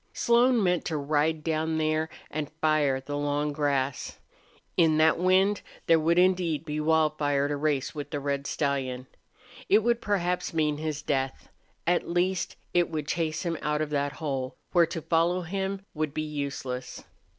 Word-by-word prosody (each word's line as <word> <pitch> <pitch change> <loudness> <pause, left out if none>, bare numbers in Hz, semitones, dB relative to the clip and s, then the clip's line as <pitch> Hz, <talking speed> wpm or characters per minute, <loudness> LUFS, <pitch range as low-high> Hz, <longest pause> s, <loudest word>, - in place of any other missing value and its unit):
Slone 240 -1 +3
meant 180 -2 +2
to 160 - -1
ride 150 +2 0
down 160 0 0
there 155 0 0 0.2
and 150 -1 -3
fire 150 -4 +2
the 145 +2 -6
long 145 0 0
grass. 140 -3 -1 0.6
In 160 -3 +4
that 160 +1 +4
wind 190 +3 +3 0.2
there 165 -1 +5
would 165 +2 +2
indeed 180 -4 +2
be 150 -1 -3
wildfire 150 -2 +2
to 145 - -1
race 145 -2 0
with 145 -1 -6
the 145 - -3
red 140 0 -2
stallion. 130 -3 -1 0.6
It 210 +2 +5
would 235 0 +1
perhaps 180 -4 -1
mean 150 -2 +1
his 155 -1 -3
death; 135 -2 -2 0.4
at 175 +1 +1
least 180 +1 0 0.2
it 175 -1 +3
would 155 -2 -4
chase 160 0 -1
him 170 -2 -2
out 150 0 0
of 150 - -6
that 145 -1 0
hole, 135 -5 -3 0.2
where 170 -2 +5
to 165 -1 -5
follow 170 +2 +2
him 195 +2 -3
would 155 -2 -3
be 155 - -1
useless. 140 -4 -5
155 Hz, 165 wpm, -27 LUFS, 145-170 Hz, 0.6 s, there